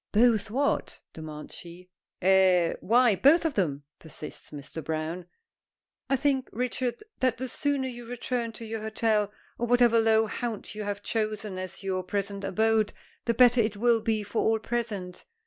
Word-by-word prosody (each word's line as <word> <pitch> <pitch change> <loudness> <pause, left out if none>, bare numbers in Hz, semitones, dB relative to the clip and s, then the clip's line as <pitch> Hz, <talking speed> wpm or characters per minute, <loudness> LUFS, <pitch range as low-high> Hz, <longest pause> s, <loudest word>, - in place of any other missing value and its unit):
"Both 220 -1 +4
what?" 275 +6 0
demands 155 -1 -8
she. 180 +1 -11 0.3
"Eh? 185 -2 +5
Why, 235 +1 +4
both 310 - +5
of 320 - +1
them," 150 - -1 0.2
persists 155 -1 -8
Mr. 150 +2 -8
Browne. 160 +3 -3 0.8
"I 270 - +4
think, 270 -1 0
Richard, 250 - -2 0.2
that 255 -3 +2
the 260 +2 -3
sooner 280 +1 -1
you 240 -2 -8
return 240 -1 -3
to 230 +1 -8
your 225 0 -4
hotel, 220 -1 +1 0.3
or 240 - 0
whatever 240 -1 +5
low 220 0 +4
haunt 225 0 -4
you 210 0 -5
have 205 0 -4
chosen 215 -3 -2
as 185 +1 -7
your 190 -1 -1
present 200 +1 -3
abode, 220 +1 +2 0.3
the 235 - +1
better 245 0 +6
it 215 -2 -1
will 235 +1 +3
be 220 -1 0
for 215 - -1
all 220 0 +3
present." 215 -6 -4
220 Hz, 165 wpm, -28 LUFS, 190-240 Hz, 0.8 s, better